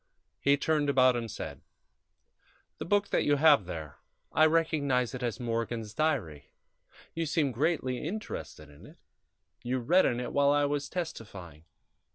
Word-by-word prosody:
He 140 0 +3
turned 150 0 0
about 130 -2 +4
and 115 -1 -3
said: - - -7 1.2
"The - - -4
book 205 +2 +1
that - - +1
you 145 - +3
have 145 - +5
there 80 -5 -7 0.3
I 155 0 +5
recognize 145 -6 +1
it 130 - -6
as 120 0 -3
Morgan's 115 -2 -3
diary. 115 - -2 0.6
You 165 -1 -2
seemed 145 -3 0
greatly 130 -2 0
interested 165 - -6
in 70 - -15
it; - - -17 0.6
you 125 +2 -2
read 165 +10 +3
in 120 - -1
it 125 - -5
while 140 0 +3
I 145 0 +3
was 145 0 -2
testifying. 95 - -7
135 Hz, 155 wpm, -29 LUFS, 115-155 Hz, 1.2 s, have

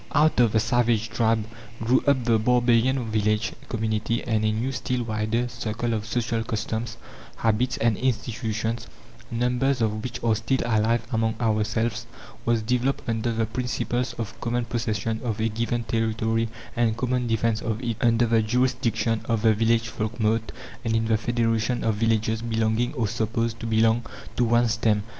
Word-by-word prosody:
Out 150 -1 +3
of 120 -3 +5
the 110 - +4
savage 115 -1 +1
tribe 115 -2 +1 0.3
grew 115 +3 +2
up 135 -3 +3
the 115 -2 +3
barbarian 120 +1 +2
village 105 +1 +1 0.2
community; 110 0 -1
and 110 -3 0
a 110 - +2
new, 115 +5 -1
still 125 -1 -2
wider, 110 +2 -1
circle 120 -1 -3
of 110 0 -3
social 115 -1 -1
customs, 110 0 -3 0.4
habits, 115 +3 +1
and 115 -2 +2
institutions, 115 -2 -2 0.4
numbers 125 +3 +1
of 110 -1 0
which 120 -1 -4
are 115 -1 +3
still 120 +4 0
alive 115 0 +2
among 110 -1 +1
ourselves, 110 0 0 0.4
was 115 -2 +2
developed 125 +4 0
under 115 0 0
the 115 0 0
principles 125 +1 -2
of 115 -3 -6
common 120 0 -1
possession 110 -1 -2
of 115 -3 -2
a 110 +1 +1
given 115 +2 -1
territory 115 0 0 0.3
and 115 -2 +1
common 125 -1 0
defence 115 0 +1
of 110 -1 -2
it, 115 -2 -1
under 120 -1 +4
the 115 -1 +3
jurisdiction 115 -1 +1
of 115 -2 0
the 110 -1 +6
village 115 +1 +2
folkmote, 110 0 -1 0.3
and 115 -2 0
in 115 0 +1
the 110 0 +2
federation 115 +1 0
of 115 - +2
villages 110 0 +1
belonging, 115 +1 0
or 115 -5 0
supposed 115 +1 -1
to 115 - -4
belong, 115 +1 +3 0.3
to 120 - +2
one 120 +1 +3
stem. 110 -2 +1
115 Hz, 165 wpm, -25 LUFS, 110-120 Hz, 0.4 s, the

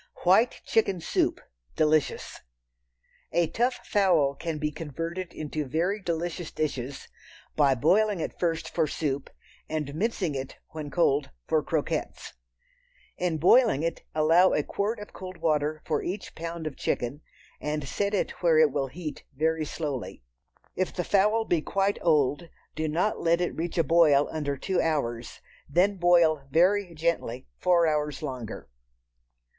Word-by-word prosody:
White 195 +7 +4
Chicken 200 -5 +1
Soup - - 0 0.4
(Delicious). 155 -1 +1 0.9
A 175 - +3
tough 245 +8 -1
fowl 175 -9 +3
can 160 +2 -4
be 150 0 -1
converted 165 +4 -5
into 155 -1 -4
very 170 +9 -1
delicious 170 -1 -3
dishes 135 -3 -4 0.5
by 140 -3 +4
boiling 195 - +3
it - - -5
first 165 -2 0
for 160 -2 0
soup 140 -2 -2 0.4
and 150 -3 -3
mincing 190 -2 -1
it, 135 -1 -5
when 155 -2 -6
cold, 145 -2 +2 0.2
for - - +2
croquettes. - - -3 0.9
In 175 -3 0
boiling 180 - +5
it, 165 0 -2
allow 165 +4 +5
a 150 - +1
quart 210 +8 -2
of 210 - -10
cold 185 -1 -8
water 155 -2 0
for 155 - 0
each 190 +3 -5
pound 165 0 -6
of 155 -3 -4
chicken, 130 +5 -2 0.4
and 150 -1 -3
set 200 +7 -1
it - - 0
where 165 -3 +4
it 155 -2 +5
will 135 -1 -1
heat 150 0 -7
very 160 +2 0
slowly. 145 - -5 0.5
If 185 - -1
the 180 - -1
fowl 210 +4 +2
be 170 -6 +1
quite 195 +4 0
old 155 0 +2 0.3
do 155 0 -1
not 175 +8 0
let 170 +1 +2
it 175 - -1
reach 170 +2 -3
a 165 - +4
boil 150 -3 +5
under 145 -3 -2
two 185 +5 0
hours, 120 -7 -2 0.3
then 190 +7 +2
boil 170 -5 +4
very 180 +4 +2
gently 155 -6 -1
four 175 -2 +4
hours 150 -2 -1
longer. 125 -4 -6
160 Hz, 150 wpm, -27 LUFS, 150-180 Hz, 0.9 s, boiling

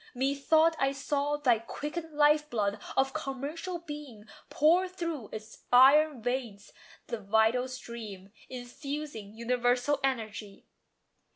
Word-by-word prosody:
Methought 280 +5 +3
I 270 0 +2
saw 285 +1 -1
Thy 250 -6 +3
quickened 300 +7 -6
life 300 0 +4
blood 205 -3 -1 0.2
of 270 0 +2
commercial 300 +7 -4
being 295 -10 -9 0.2
Pour 345 +5 +4
through 335 - -5
its 220 0 -10
iron 270 +1 +6
veins 240 -5 -3 0.3
the 235 -2 -4
vital 220 +5 +2
stream, 220 -6 -8 0.2
Infusing 255 -3 -6
universal 245 +4 +1
energy. 220 -6 -3
265 Hz, 110 wpm, -30 LUFS, 230-295 Hz, 0.3 s, iron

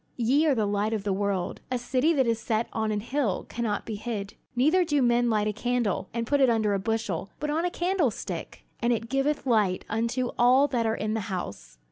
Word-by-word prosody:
"Ye 265 +7 +3
are 285 - +3
the 220 -3 +1
light 205 +2 0
of 215 -3 -2
the 200 -2 0
world. 195 -2 -2
A 255 - 0
city 255 +5 +1
that 270 -4 +2
is 230 -1 +1
set 225 0 -1
on 220 -1 0
an 210 -1 -1
hill 240 -4 -1
cannot 225 -3 -2
be 220 -2 -4
hid. 210 -2 -4 0.2
Neither 310 +9 +4
do 295 -4 +1
men 240 0 +3
light 210 -2 +1
a 210 - 0
candle, 230 -4 -1
and 230 0 -2
put 285 +3 +2
it 265 - +6
under 220 -3 +2
a 195 - +1
bushel, 210 -3 -2
but 300 0 -2
on 325 +3 0
a - - +1
candlestick; 345 - -2 0.2
and 240 0 +1
it 230 -1 -1
giveth 275 +2 0
light 210 -7 +2
unto 235 +3 -1
all 255 +4 +5
that 235 -3 0
are 220 - +1
in 215 +1 -2
the 220 - 0
house. 100 - -6
230 Hz, 225 wpm, -27 LUFS, 210-260 Hz, 0.2 s, it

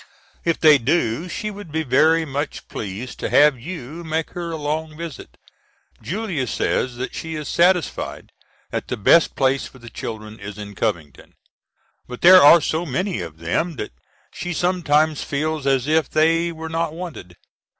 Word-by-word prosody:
If 165 -1 0
they 155 -3 +7
do 145 +3 0
she 210 +5 -4
would 200 -5 -10
be 160 +1 -1
very 160 +5 +3
much 145 +1 -4
pleased 105 +4 -6
to - - -2
have 145 -3 +5
you 165 +2 -7
make 160 0 -2
her 175 -1 -5
a 165 - -3
long 155 +1 -3
visit. 165 -4 -8 0.6
Julia 185 - -3
says 125 -1 -1
that 125 +1 -5
she 160 0 -5
is 150 -2 -5
satisfied 180 0 +1 0.4
that - - -3
the - - -3
best 165 +11 +4
place 135 0 +1
for - - -16
the 120 -2 -12
children 110 -1 -7
is 100 0 -8
in 105 -1 -8
Covington. 85 -11 -4 0.7
But 125 0 -8
there 185 +1 +9
are 155 +3 +8
so 160 +3 -1
many 175 - -2
of 80 -2 -8
them 90 - -1
that 105 - -5 0.4
she 180 0 -4
sometimes 160 -4 +1
feels 150 0 -2
as 135 -1 +2
if 155 -1 +2
they 165 +2 +2
were 160 0 -7
not 165 -1 -2
wanted. 160 - -8
155 Hz, 170 wpm, -21 LUFS, 125-165 Hz, 0.7 s, there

